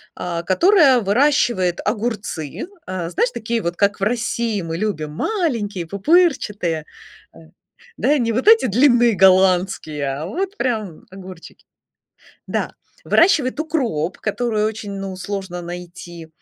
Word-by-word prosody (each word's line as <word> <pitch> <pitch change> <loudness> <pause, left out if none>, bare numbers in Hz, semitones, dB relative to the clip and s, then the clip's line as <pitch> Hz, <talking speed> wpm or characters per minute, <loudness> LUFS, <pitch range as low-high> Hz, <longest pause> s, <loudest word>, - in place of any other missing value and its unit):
а, 170 -1 -4
которая 285 - +4
выращивает 205 - +2
огурцы. 210 - -3 0.2
Э, 180 -2 -4
знаешь, 475 - 0
такие 230 +1 -2
вот, 170 0 -3
как 200 0 +1
в - - -3
России 230 -1 -1
мы 165 -1 -4
любим, 170 -7 -3
маленькие 215 - -2
пупырчатые. 205 - +1 0.5
А. - - -16 0.6
Да, 290 +6 +2
не 230 -1 0
вот 255 - -2
эти 445 - +6
длинные 240 0 +4
голландские, 185 -5 +3
а 155 - -5
вот 385 - -4
прям 215 -10 -3
огурчики 185 -3 -12 0.8
Да. - - -2 0.3
Выращивает 310 -5 +3
укроп, 240 - -2
который 215 0 -1
очень, 215 -2 -4
ну, 195 -1 -5
сложно 190 -2 -5
найти, 175 -1 -9
205 Hz, 125 wpm, -20 LUFS, 180-245 Hz, 0.8 s, эти